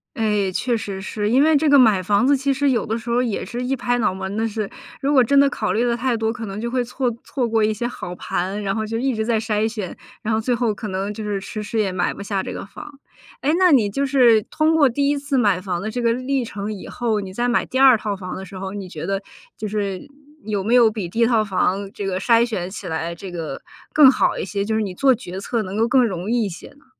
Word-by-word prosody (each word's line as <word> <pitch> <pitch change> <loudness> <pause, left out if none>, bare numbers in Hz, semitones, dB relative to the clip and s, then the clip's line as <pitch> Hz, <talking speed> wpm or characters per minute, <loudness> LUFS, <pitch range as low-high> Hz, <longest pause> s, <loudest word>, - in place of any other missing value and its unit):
哎， 210 -4 +1
确 240 +5 0
实 200 -3 -5
是。 210 +1 -3
因 260 +5 +4
为 315 0 +4
这 305 +2 +1
个 285 -1 +7
买 215 -7 +5
房 200 +6 +2
子 280 0 +4
其 275 +1 0
实 280 +1 +1
有 245 -3 +1
的 220 - -2
时 235 +1 -8
候 245 +2 +2
也 225 -5 -2
是 245 +1 -5
一 260 +2 0
拍 245 -1 0
脑 225 - +1
门 190 +2 -5
的 225 +1 +1
事。 215 -2 -3 0.3
如 280 +1 +1
果 260 -3 +6
真 280 +4 +4
的 280 0 +5
考 215 - -2
虑 230 - +1
得 240 -1 +1
太 250 0 0
多， 225 0 0
可 235 -1 -6
能 200 +1 -6
就 235 - -2
会 250 0 0
错 245 +1 -1
错 250 -4 -2
过 225 -1 +2
一 215 0 +2
些 240 +3 -3
好 180 -7 -7
盘， 190 +4 -3
然 195 -1 -1
后 220 -1 -1
就 225 +1 -3
一 265 -1 0
直 220 0 -1
在 225 -1 +1
筛 215 -1 0
选， 215 -5 -5 0.3
然 220 - -2
后 220 - +2
最 245 +3 0
后 235 -2 +1
可 210 +1 -6
能 195 +2 -2
就 215 +1 -6
是 205 -2 -2
迟 210 +2 -6
迟 215 +2 -2
也 200 -3 +1
买 180 -1 -1
不 - - -9
下 200 -1 -2
这 - - -5
个 - - -6
房。 280 +8 -11 0.4
诶， 295 +3 +2
那 365 -2 +5
你 230 -7 +4
就 275 +8 -1
是 245 -6 +5
通 315 +6 +1
过 295 -4 +5
第 280 +3 +1
1 290 - +1
次 280 0 -3
买 205 -6 +3
房 180 -2 -3
的 215 - -3
这 245 +3 -4
个 230 -1 +2
历 255 +1 -1
程 210 -1 -5
以 205 - -7
后， 230 -3 -1
你 190 -2 -7
再 240 +4 0
买 240 - +1
第 260 - -2
2 265 -3 +7
套 210 -1 -3
房 185 -1 -6
的 190 - -7
时 195 +1 -12
候， 190 0 -5
你 200 -2 -6
觉 165 -2 -7
得 195 0 -2 0.3
就 215 - -4
是， 200 -3 -3 0.4
有 205 -3 -2
没 230 +5 +2
有 235 -3 +6
比 205 -6 -4
第 225 - -5
1 - - +6
套 230 -2 +3
房 195 0 0
这 205 - -6
个 185 -1 -1
筛 230 +3 +4
选 190 -7 -3
起 190 - -7
来 165 +1 -3
这 185 +2 -8
个 165 -5 -6 0.3
更 280 -3 +8
好 - - +1
一 - - -3
些， 200 +2 -2
就 220 +2 -1
是 220 - +1
你 200 -3 -3
做 265 +7 +3
决 190 -6 -7
策 225 +3 -2
能 190 0 -6
够 225 +2 +2
更 255 -1 +4
容 185 -2 -3
易 240 0 +2
一 200 - -2
些 170 - -10
呢？ 285 - -23
220 Hz, 300 characters per minute, -21 LUFS, 195-245 Hz, 0.4 s, 更